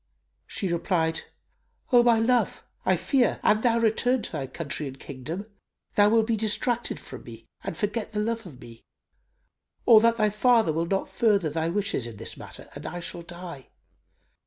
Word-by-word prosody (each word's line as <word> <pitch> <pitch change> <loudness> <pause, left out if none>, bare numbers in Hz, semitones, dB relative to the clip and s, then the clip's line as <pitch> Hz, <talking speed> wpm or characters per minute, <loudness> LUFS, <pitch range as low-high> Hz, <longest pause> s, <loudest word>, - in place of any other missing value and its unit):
She 195 - -2
replied, 165 -2 0 0.7
"O 245 -1 +7
my 240 -1 +5
love, 240 +2 +1 0.2
I - - +5
fear, 260 -5 +2
an 215 +1 +4
thou 235 -1 +3
return 230 +2 +2
to - - -4
thy 140 -5 -3
country 150 +1 -4
and 135 0 -9
kingdom, 155 +9 -6 0.5
thou 205 0 +5
wilt 225 0 +4
be 230 0 +1
distracted 225 +3 0
from - - -10
me - - -11 0.2
and - - -5
forget 210 +1 -2
the 210 - -2
love 225 -1 -2
of 135 -7 -12
me; 115 -1 -13 1.0
or 225 -2 +9
that 230 +1 +3
thy 215 -2 +2
father 225 -5 +3
will 165 +2 -1
not 195 +2 0
further 200 -9 +2
thy 160 +1 -1
wishes 185 - -1
in 115 -3 -9
this - - -6
matter - - -11
and - - -7
I 175 +2 -5
shall 170 0 -6
die. 170 -5 -9
205 Hz, 180 wpm, -26 LUFS, 165-230 Hz, 1.0 s, or